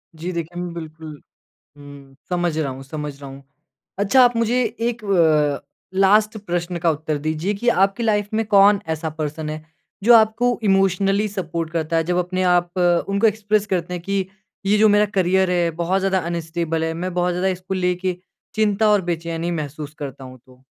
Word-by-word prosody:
जी 170 Hz, +3 st, -5 dB
देखिए, 170 Hz, +1 st, -5 dB
मैं 175 Hz, -1 st, -5 dB
बिल्कुल 160 Hz, -2 st, -9 dB, 0.6 s
हुँ। 140 Hz, -1 st, -13 dB
समझ 175 Hz, -3 st, -1 dB
रहा 150 Hz, -4 st, -1 dB
हूँ 130 Hz, +1 st, -9 dB
समझ 150 Hz, 0 st, -6 dB
रहा 140 Hz, -, -8 dB
हूँ। 135 Hz, +1 st, -11 dB, 0.6 s
अच्छा 250 Hz, +6 st, +5 dB
आप 245 Hz, -1 st, +3 dB
मुझे 235 Hz, +2 st, +2 dB, 0.2 s
एक 235 Hz, -1 st, -2 dB
व 155 Hz, -7 st, +3 dB, 0.4 s
लास्ट 210 Hz, +3 st, +4 dB
प्रश्न 175 Hz, 0 st, -2 dB
का 170 Hz, -, +4 dB
उत्तर 155 Hz, 0 st, -3 dB
दीजिए 155 Hz, +6 st, -2 dB
कि 240 Hz, +5 st, -5 dB
आपकी 195 Hz, +1 st, +2 dB
लाइफ़ 210 Hz, -2 st, +1 dB
में 225 Hz, 0 st, 0 dB
कौन 200 Hz, 0 st, +5 dB
ऐसा 160 Hz, 0 st, -2 dB
पर्सन 155 Hz, 0 st, -3 dB
है 155 Hz, 0 st, -6 dB, 0.4 s
जो 235 Hz, +2 st, +7 dB
आपको 230 Hz, +2 st, +3 dB
इमोशनली 195 Hz, +1 st, +2 dB
सपोर्ट 170 Hz, -5 st, -4 dB
करता 165 Hz, 0 st, -1 dB
है? 165 Hz, -, +2 dB
जब 175 Hz, +2 st, -1 dB
अपने 185 Hz, +1 st, -1 dB
आप 175 Hz, -1 st, +2 dB, 0.4 s
उनको 200 Hz, +3 st, +3 dB
एक्सप्रेस 210 Hz, -1 st, 0 dB
करते 180 Hz, -2 st, -2 dB
हैं 175 Hz, -, -4 dB
कि 195 Hz, 0 st, -1 dB, 0.4 s
ये 205 Hz, +2 st, +3 dB
जो 215 Hz, +1 st, +5 dB
मेरा 205 Hz, 0 st, +4 dB
करियर 190 Hz, 0 st, +2 dB
है 175 Hz, -2 st, +1 dB
बहुत 185 Hz, +3 st, +1 dB
ज़्यादा 190 Hz, 0 st, +1 dB
अनस्टेबल 165 Hz, -1 st, -2 dB
है। 160 Hz, 0 st, -1 dB
मैं 180 Hz, +2 st, -4 dB
बहुत 180 Hz, 0 st, +1 dB
ज़्यादा 180 Hz, +2 st, 0 dB
इसको 185 Hz, 0 st, -3 dB
लेके 180 Hz, 0 st, -1 dB, 0.4 s
चिंता 215 Hz, 0 st, +2 dB
और 205 Hz, -2 st, +3 dB
बेचैनी 165 Hz, 0 st, -3 dB
महसूस 150 Hz, -2 st, -5 dB
करता 135 Hz, -2 st, -7 dB
हूँ 130 Hz, 0 st, -11 dB
तो। 130 Hz, 0 st, -21 dB
180 Hz, 185 wpm, -21 LUFS, 160-200 Hz, 0.6 s, जो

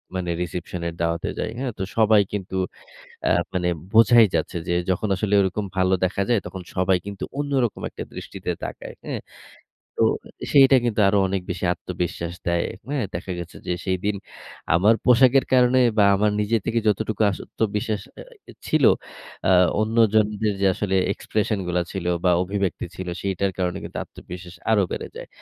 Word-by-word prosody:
মানে 90 Hz, -2 st, -2 dB
রিসেপশন 90 Hz, 0 st, -5 dB
এর 85 Hz, -, -4 dB
দাওয়াতে 85 Hz, 0 st, -1 dB
যাই। -, -, -2 dB
হ্যাঁ? 130 Hz, -1 st, -2 dB
তো 95 Hz, -, -2 dB
সবাই 110 Hz, -2 st, +5 dB
কিন্তু 95 Hz, -2 st, -4 dB, 0.7 s
আ -, -, +4 dB, 0.2 s
মানে 90 Hz, -1 st, 0 dB, 0.2 s
বোঝাই 115 Hz, +1 st, +7 dB
যাচ্ছে 80 Hz, +2 st, -1 dB
যে 85 Hz, -, 0 dB, 0.2 s
যখন 95 Hz, +4 st, 0 dB
আসলে 100 Hz, +2 st, -2 dB
ওরকম 100 Hz, +2 st, -1 dB
ভালো 95 Hz, 0 st, +3 dB
দেখা 95 Hz, +2 st, -1 dB
যায় 120 Hz, -3 st, +4 dB
তখন 95 Hz, -, -7 dB
সবাই 95 Hz, 0 st, +3 dB
কিন্তু 100 Hz, -1 st, -6 dB, 0.2 s
অন্যরকম 135 Hz, -6 st, 0 dB
একটা -, -, -7 dB
দৃষ্টিতে -, -, -5 dB
তাকায়, -, -, -7 dB
হ্যাঁ। -, -, -4 dB, 0.8 s
তো -, -, +3 dB, 0.5 s
সেইটা 135 Hz, -1 st, +7 dB
কিন্তু 115 Hz, -3 st, 0 dB
আরো 100 Hz, +1 st, +3 dB
অনেক 95 Hz, 0 st, -1 dB
বেশি -, -, -3 dB
আত্মবিশ্বাস 85 Hz, -1 st, -4 dB
দেয়, 85 Hz, 0 st, +1 dB, 0.2 s
হ্যাঁ? 140 Hz, -3 st, -1 dB
দেখা 90 Hz, +2 st, -4 dB
গেছে 85 Hz, 0 st, -8 dB
যে -, -, +1 dB
সেইদিন 95 Hz, +2 st, -1 dB, 0.6 s
আমার 100 Hz, +6 st, +5 dB
পোশাকের 130 Hz, +2 st, +5 dB
কারণে 125 Hz, 0 st, +5 dB, 0.2 s
বা 105 Hz, -, +6 dB
আমার 105 Hz, +2 st, +2 dB
নিজের 105 Hz, +1 st, +1 dB
থেকে 115 Hz, 0 st, +1 dB
যতটুকু 110 Hz, +1 st, 0 dB
আত্মবিশ্বাস 105 Hz, +1 st, -2 dB
অ্যা -, -, -9 dB, 0.4 s
ছিল 155 Hz, -2 st, +2 dB, 0.7 s
আ -, -, +5 dB, 0.3 s
অন্যজনদের 110 Hz, -1 st, +2 dB
যে -, -, +3 dB
আসলে 95 Hz, 0 st, -1 dB, 0.2 s
এক্সপ্রেশন 105 Hz, -1 st, -1 dB
গুলা 90 Hz, 0 st, +1 dB
ছিল 95 Hz, -3 st, -5 dB, 0.2 s
বা 90 Hz, -, +4 dB
অভিব্যক্তি 100 Hz, -1 st, -2 dB
ছিল 95 Hz, -1 st, -6 dB
সেইটার 100 Hz, 0 st, -1 dB
কারণে 90 Hz, -1 st, -1 dB
কিন্তু -, -, -7 dB
আত্মবিশ্বাস 90 Hz, 0 st, -11 dB, 0.2 s
আরো 105 Hz, -2 st, +4 dB
বেড়ে -, -, -4 dB
যায়। -, -, -8 dB
100 Hz, 165 wpm, -23 LUFS, 90-110 Hz, 0.8 s, বোঝাই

